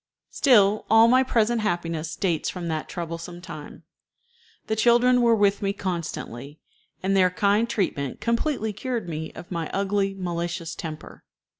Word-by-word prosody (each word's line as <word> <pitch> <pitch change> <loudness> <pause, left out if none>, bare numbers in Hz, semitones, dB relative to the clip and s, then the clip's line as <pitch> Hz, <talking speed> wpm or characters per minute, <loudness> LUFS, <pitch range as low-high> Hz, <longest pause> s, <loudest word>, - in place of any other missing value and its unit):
Still, 215 -6 +4
all 225 +1 +7
my 255 +2 +5
present 235 -2 +1
happiness 165 -5 -2
dates 170 -5 -1
from 175 -2 -5
that 155 -1 -3
troublesome 170 0 -6
time. 165 -4 -10 0.8
The 220 - -1
children 245 +2 +4
were 235 -1 +5
with 205 -1 +2
me 200 -1 0
constantly, 155 - -5 0.4
and 195 +1 +1
their 185 -1 +5
kind 205 +5 +1
treatment 140 - -2
completely 235 -1 -1
cured 235 -1 -4
me 160 -1 -5
of 175 - -11
my 165 -3 -3
ugly, 195 0 0
malicious 170 -2 -3
temper. 155 -2 -8
195 Hz, 145 wpm, -25 LUFS, 170-220 Hz, 0.8 s, all